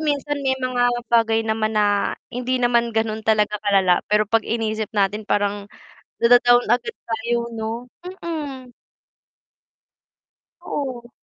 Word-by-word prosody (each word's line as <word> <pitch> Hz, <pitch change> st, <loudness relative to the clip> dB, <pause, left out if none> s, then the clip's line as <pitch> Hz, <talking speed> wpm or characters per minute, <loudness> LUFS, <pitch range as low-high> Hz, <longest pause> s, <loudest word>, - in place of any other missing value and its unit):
minsan 290 Hz, -1 st, -1 dB
may 265 Hz, -1 st, 0 dB
mga 255 Hz, -1 st, +1 dB, 0.2 s
bagay 225 Hz, -1 st, +3 dB
naman 220 Hz, 0 st, -1 dB
na 205 Hz, -1 st, +1 dB, 0.2 s
hindi 250 Hz, +1 st, -1 dB
naman 235 Hz, -2 st, +1 dB
ganon 220 Hz, 0 st, 0 dB
talaga 210 Hz, -1 st, +2 dB
kalala 195 Hz, -3 st, +3 dB
pero 210 Hz, +1 st, +3 dB
'pag 225 Hz, +1 st, +1 dB
inisip 220 Hz, -1 st, -2 dB
natin 205 Hz, +2 st, 0 dB
parang 205 Hz, 0 st, 0 dB, 0.5 s
nada-down 245 Hz, +1 st, +5 dB
agad 245 Hz, -, +1 dB, 0.2 s
tayo 235 Hz, +1 st, -1 dB
'no, 225 Hz, +2 st, -5 dB, 0.2 s
mm. 310 Hz, -8 st, -6 dB, 1.9 s
Oo. 255 Hz, -8 st, -5 dB
230 Hz, 120 wpm, -22 LUFS, 215-250 Hz, 1.9 s, nada-down